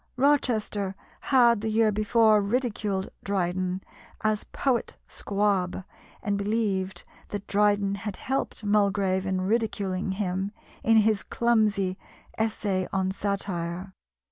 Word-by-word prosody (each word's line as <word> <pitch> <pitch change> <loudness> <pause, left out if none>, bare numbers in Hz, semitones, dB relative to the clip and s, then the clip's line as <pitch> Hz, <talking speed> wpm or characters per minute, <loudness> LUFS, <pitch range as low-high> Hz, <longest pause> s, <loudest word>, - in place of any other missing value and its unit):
Rochester 225 -8 +1 0.3
had 235 -5 +5
the 220 - -1
year 220 0 +3
before 215 +1 +4
ridiculed 205 -3 -1
Dryden 185 -1 -1 0.4
as 215 -1 +1
"Poet 255 -4 -1
Squab," 195 -3 -1 0.4
and 200 -1 0
believed 200 -3 -1 0.2
that 205 -1 -5
Dryden 205 -1 +2
had 210 -3 -4
helped 265 -3 -3
Mulgrave 200 -2 +2
in 190 -1 0
ridiculing 195 -2 -1
him 190 0 -2 0.3
in 225 0 +5
his 215 -2 +3
clumsy 215 -5 +1 0.4
"Essay 205 -4 -1
on 190 -1 0
Satire." 190 -2 -3
205 Hz, 110 wpm, -27 LUFS, 190-220 Hz, 0.4 s, had